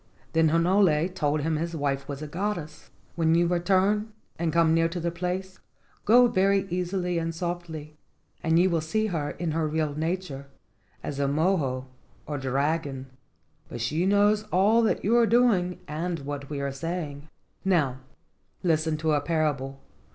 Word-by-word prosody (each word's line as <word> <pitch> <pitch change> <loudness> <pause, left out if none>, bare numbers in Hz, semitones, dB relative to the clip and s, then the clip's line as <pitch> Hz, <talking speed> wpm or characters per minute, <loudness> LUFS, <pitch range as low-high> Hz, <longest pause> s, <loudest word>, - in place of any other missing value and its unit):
Then 160 -1 +4
Hinole 170 0 +3
told 150 -4 0
him 155 +1 0
his 170 +2 -3
wife 140 -2 -2
was 140 +1 -5
a - - -5
goddess. 175 -1 -4 0.3
"When 165 -1 +3
you 170 +1 +4
return 190 +5 +1 0.3
and 165 -1 0
come 165 0 +3
near 165 0 +3
to 175 +1 -4
the 170 0 -1
place, 180 +2 -4 0.5
go 245 +3 +7
very 195 -2 +2
easily 180 -1 -1
and 165 0 -3
softly, 165 -3 -5 0.4
and 165 0 +2
you 180 +2 +5
will 165 -2 +1
see 215 +8 0
her 160 -8 -2
in 165 -1 -3
her 160 0 0
real 155 -1 -1
nature, 155 -3 -3 0.6
as 140 - -4
a 140 - +1
mo 160 +7 +2
o, 130 -1 -3 0.4
or 145 -1 -4
dragon; 135 0 -1 0.6
but 120 - -6
she 155 +10 0
knows 205 +1 +4
all 205 +6 +4
that 225 - +1
you 225 +4 +3
are 235 -1 +5
doing 210 -6 +3
and 165 +2 -3
what 140 0 -6
we 145 -2 -4
are 140 0 -2
saying. 150 0 -5 0.4
Now 155 -9 +1 0.6
listen 160 -2 +1
to 155 +1 0
a 145 -1 +2
parable. 145 -4 -1
165 Hz, 165 wpm, -26 LUFS, 150-180 Hz, 0.6 s, go